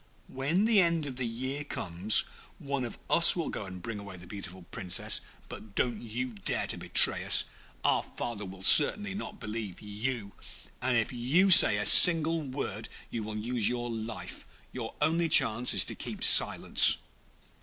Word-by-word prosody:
When 150 +10 -3
the 220 -3 +2
end 170 -3 -2
of 130 -3 -9
the 125 -2 -4
year 130 +5 -7
comes, 95 -2 -1 0.3
one 140 -2 -6
of 120 - -10
us 170 - +3
will 170 -3 -5
go 105 - -8
and 90 -1 -12
bring 115 -3 -8
away 100 -2 -12
the 90 - -15
beautiful 95 -2 -11
Princess. 90 -2 -3 0.3
But 105 -2 -14
don't 120 -3 -3 0.4
dare - - -1
to - - -5
betray - - +2
us. - - +3 0.4
Our - - 0
father 115 -3 -8
will 95 -1 -12
certainly 195 - +6
not 210 +1 -10
believe 105 -4 -8
you, 105 0 -7 0.5
and 125 -1 -2
if 115 +2 -3
you 145 +11 0
say 170 - +7
a 105 - -4
single 165 - +5
word 130 -6 -8 0.2
you 115 - -6
will 105 0 -9
lose 115 0 -1
your 120 -1 -6
life; 115 0 -9 0.3
your - - -9
only 165 +1 -1
chance 115 -3 +3
is - - +1
to - - -8
keep - - -9
silence.' - - +6
120 Hz, 170 wpm, -27 LUFS, 105-150 Hz, 0.5 s, say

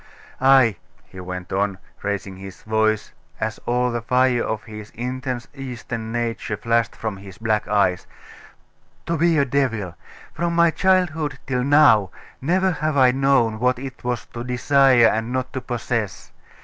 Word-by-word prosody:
Ay,' 130 -6 +5 0.3
he 95 - -12
went 90 0 -6
on, 100 0 0 0.2
raising 100 -1 -3
his 95 -1 -11
voice, 110 0 0 0.3
as - - -3
all 125 +1 +1
the 120 0 -2
fire 125 +1 +2
of 110 -1 -3
his 105 -1 -10
intense 125 +1 -4
Eastern 120 -4 -6
nature 115 -2 -2
flashed 115 +1 0
from 110 -3 -4
his 95 -1 -12
black 110 -2 -1
eyes, 100 -3 +1 1.0
'to 170 - -1
be 165 0 +2
a 140 - +3
devil! 120 -9 -1 0.4
From 170 +1 -1
my 170 -1 +5
childhood 160 -5 +1
till 125 -2 -1
now 140 -9 +5 0.3
never 185 +7 +2
have 155 -2 -1
I 130 -2 +6
known 130 -4 +2
what 125 +1 +2
it 130 0 -8
was 125 -1 -2
to 120 - -5
desire 125 0 +4
and 110 +1 +1
not 130 0 -3
to 130 - -3
possess. 115 -5 -3
120 Hz, 155 wpm, -22 LUFS, 110-135 Hz, 1.0 s, I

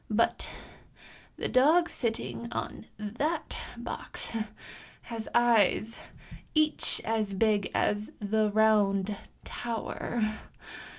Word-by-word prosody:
But 220 +2 +1 0.9
the - - -1
dog 310 +7 +5
sitting 235 -2 -3
on 225 - -4
that 240 +11 -2 0.2
box - - -5 0.7
has 225 -2 -5
eyes 230 -2 +4 0.6
each 310 0 +2
as 215 -3 0
big 210 -1 +2
as 210 0 +1
the 215 +1 +2
Round 205 -2 +3 0.3
Tower. 235 0 -3
220 Hz, 85 wpm, -30 LUFS, 210-240 Hz, 0.9 s, dog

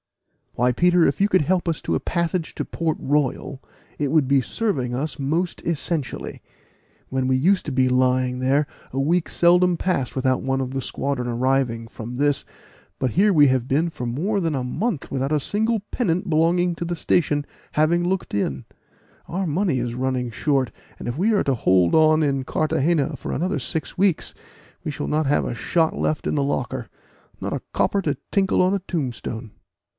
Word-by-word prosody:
"Why, 125 +1 +3
Peter, 175 +4 +4
if 140 +6 0
you 200 - +4
could 185 -5 +3
help 175 +2 +1
us 160 - -1
to - - -1
a - - +1
passage 170 -1 -2
to - - -3
Port 165 -2 -2
Royal, 140 -1 -1 0.4
it 145 -2 0
would 155 -4 +3
be 135 0 +4
serving 130 - -1
us 150 +5 -3
most 160 +6 -1
essentially. 160 -2 -3 0.7
When 130 -1 -1
we 130 0 +3
used 185 +8 +2
to - - -2
be 130 -1 +2
lying 125 0 +2
there 135 +3 +2 0.3
a 135 - -2
week 165 +5 +1
seldom 175 0 +4
passed 160 -10 -1
without 130 -1 +1
one 135 0 0
of 130 -1 -3
the 135 - -2
squadron 130 0 -2
arriving 120 -1 0
from 115 +2 -7
this; 145 0 +1 0.6
but 130 -2 0
here 195 - +3
have 200 - +3
we 145 -4 +6
been 140 +7 0
for 125 - -6
more 180 - -1
than 165 -4 0
a 130 - -1
month 160 - -2
without 135 +1 -2
a 155 - +3
single 220 - 0
pennant 185 -5 0
belonging 170 +2 +2
to 170 - -4
the 175 +1 -2
station 145 -4 +1 0.3
having 165 +3 +3
looked 185 +1 -2
in: 70 -10 -1 0.6
our 185 +2 -2
money 165 -1 +1
is 120 -1 -3
running 130 -1 -1
short, 135 -1 0 0.3
and - - -6
if 120 +3 -3
we 205 +7 +2
are 205 - +3
to 135 - +1
hold 90 -5 +3
on 155 0 +5
in 135 -2 0
Carthagena 155 +1 +1
for - - -5
another 170 -1 -1
six 140 +5 -4
weeks, 190 -3 +1 0.5
we - - -2
shall 140 - -4
not 155 -1 +1
have 145 - +2
a - - -3
shot 160 +7 +1
left 155 - -1
in - - 0
the 145 - +1
locker 135 -3 -2 0.5
not - - -3
a - - -3
copper 200 - +1
to 150 -6 -1
tinkle 195 -3 +2
on 185 +1 +3
a 200 - +1
tombstone." 125 - -4
145 Hz, 190 wpm, -23 LUFS, 130-175 Hz, 0.7 s, we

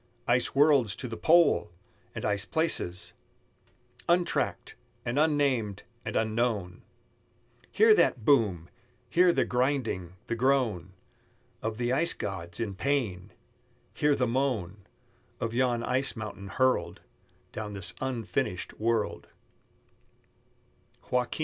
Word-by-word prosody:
Ice 120 +2 +2
worlds 140 - +4
to 125 - -5
the 115 - -5
pole! 165 -9 +4 0.5
and - - -4
ice 100 -1 0
places 155 - 0 1.0
Untracked, 175 0 0 0.3
and 120 +4 0
unnamed, 140 -10 +1 0.2
and 110 - -5
unknown! 110 -5 -1 0.9
Hear 440 0 +6
that 120 - +2
boom! 105 - +3 0.4
Hear 180 +1 +5
the - - +1
grinding, 125 -9 -1
the - - -3
groan 115 -8 +1 0.7
Of 110 0 -3
the 120 +1 0
ice 165 +5 +3
gods 85 -2 -5
in 110 -4 -2
pain! 105 -5 -2 0.6
Hear 145 -1 +2
the 130 - +1
moan 115 -7 -2 0.5
Of 115 0 -3
yon 120 -1 +1
ice 130 +3 0
mountain 105 -3 -7
hurled 115 -7 0 0.5
Down 105 -1 -6
this 100 +2 -4
unfinished 115 -8 -3
world. 115 -1 -1
115 Hz, 110 wpm, -28 LUFS, 100-135 Hz, 1.0 s, Hear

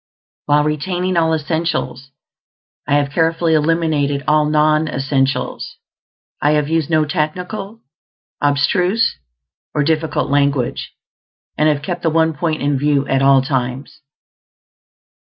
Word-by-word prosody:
While 150 0 +3
retaining 175 +5 -2
all 165 -1 +2
essentials, 160 -4 -2 0.8
I 145 - +2
have 145 -1 +1
carefully 165 +1 +1
eliminated 150 -3 +1
all 150 0 +3
non 155 +1 +2
essentials; 135 -2 -2 0.7
I 145 +2 +3
have 150 -1 +1
used 160 -1 0
no 155 -2 +2
technical, 180 +7 -4 0.6
abstruse, 180 +9 +1 0.6
or 150 - +2
difficult 155 -1 -1
language, 140 -2 0 0.6
and 155 0 +2
have 145 -1 -1
kept 175 +2 -4
the 165 - +1
one 160 0 +2
point 155 0 -2
in 140 -1 +1
view 145 -1 +1
at 135 0 +1
all 135 -1 +5
times. 130 +1 -3
150 Hz, 120 wpm, -18 LUFS, 140-165 Hz, 0.8 s, all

